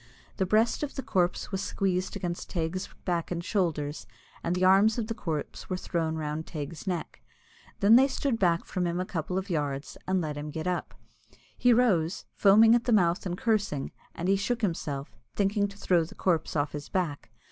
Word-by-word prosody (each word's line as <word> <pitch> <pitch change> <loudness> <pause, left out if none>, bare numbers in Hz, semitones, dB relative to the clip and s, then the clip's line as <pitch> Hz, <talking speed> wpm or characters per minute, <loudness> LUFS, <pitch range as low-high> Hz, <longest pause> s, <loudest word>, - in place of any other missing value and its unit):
The 190 - +1
breast 220 +4 +2
of 295 -2 -3
the 270 - -4
corpse 180 +1 0
was 190 -1 -2
squeezed 185 -1 -1
against 175 -3 -4
Teig's 175 +3 -2 0.2
back 170 -3 -1
and 170 -1 -3
shoulders, 155 - -1 0.4
and 170 +1 0
the 185 +1 +2
arms 200 +4 +5
of 230 - -1
the 225 - -3
corpse 160 -9 -5
were 185 - -1
thrown 165 -3 -2
around 155 +1 -3
Teig's 155 +1 -6
neck. 175 -3 -3 0.6
Then 215 +4 +8
they 265 +2 +6
stood 265 -3 -1
back 170 -3 +2
from 180 -2 -1
him 170 +1 -1
a 185 - -1
couple 180 0 -3
of 190 0 -3
yards, 145 -3 -2
and 190 0 +2
let 150 -3 -3
him 150 +1 -5
get 160 +1 -5
up. 180 -1 -2 0.6
He 245 - +4
rose, 195 -9 +2
foaming 215 +3 +6
at 240 0 +2
the 245 - +1
mouth 180 -3 +3
and 175 0 -3
cursing, 205 -12 0 0.2
and 175 - -3
he 195 - +4
shook 235 +4 -2
himself, 150 -7 -2 0.2
thinking 205 0 +2
to 200 0 -12
throw 180 -4 +2
the 160 - -10
corpse 165 -4 0
off 145 0 0
his 145 -1 -7
back. 165 -10 -2
180 Hz, 200 wpm, -28 LUFS, 160-200 Hz, 0.6 s, Then